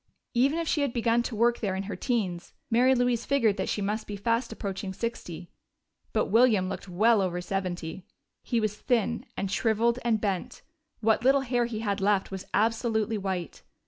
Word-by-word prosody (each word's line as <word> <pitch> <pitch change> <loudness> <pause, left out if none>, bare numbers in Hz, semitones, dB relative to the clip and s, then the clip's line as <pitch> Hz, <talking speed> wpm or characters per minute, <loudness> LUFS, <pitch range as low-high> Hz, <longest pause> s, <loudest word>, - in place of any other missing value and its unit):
Even 270 +6 +3
if 335 -1 -2
she 300 - +1
had 280 -4 0
begun 235 0 +2
to 235 -1 -4
work 235 +2 +2
there 195 -4 -1
in 190 - -2
her 195 -1 -5
teens, 190 -6 -2 0.2
Mary 250 +3 +5
Louise 245 -1 +1
figured 235 -7 +2
that 190 - -2
she 205 - -1
must 210 +2 -2
be 205 - -5
fast 230 +4 0
approaching 195 -2 -4
sixty. 180 -7 -5 0.6
But 215 - +1
William 220 -4 +4
looked 190 - -6
well 215 +4 +4
over 180 -2 -1
seventy. 180 -1 -4 0.3
He 235 - 0
was 215 -2 -1
thin 235 +1 0
and 195 0 -2
shriveled 230 +2 +2
and 230 -2 +2
bent; 205 +3 -3 0.4
what 220 +1 +2
little 270 +2 +5
hair 245 -2 0
he 225 -2 -4
had 200 -2 -1
left 195 -1 +1
was 190 -1 -6
absolutely 225 0 +1
white. 190 -3 -4
220 Hz, 185 wpm, -28 LUFS, 195-235 Hz, 0.6 s, Mary